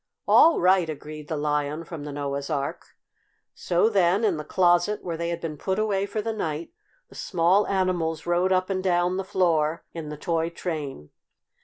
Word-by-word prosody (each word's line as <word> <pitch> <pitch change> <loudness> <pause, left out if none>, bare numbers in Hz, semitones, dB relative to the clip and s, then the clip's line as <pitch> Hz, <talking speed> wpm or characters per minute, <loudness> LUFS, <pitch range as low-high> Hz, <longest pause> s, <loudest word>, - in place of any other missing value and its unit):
"All 330 - +6
right!" 180 -2 +3
agreed 150 0 -7
the 155 - -3
Lion 150 +1 -1
from 160 -3 -8
the 145 - -5
Noah's 140 0 -4
Ark. 140 -3 -4 0.6
So 175 +4 +1
then, 195 -1 +2
in 200 -7 +2
the 150 - -5
closet 175 +5 +2
where 170 -2 -3
they 170 +1 -3
had 170 - -3
been 155 -3 -5
put 190 +5 -2
away 200 -2 0
for 215 +1 -3
the 225 - -2
night, 160 -6 -4 0.4
the - - -16
small 180 +3 +2
animals 180 -5 -1
rode 175 +2 +1
up 185 +1 +1
and 185 -1 -1
down 180 0 +1
the 195 - -2
floor 165 -4 +1
in 160 -3 -6
the 150 - -6
toy 165 +1 -1
train. 150 - -5
170 Hz, 185 wpm, -25 LUFS, 150-185 Hz, 0.6 s, All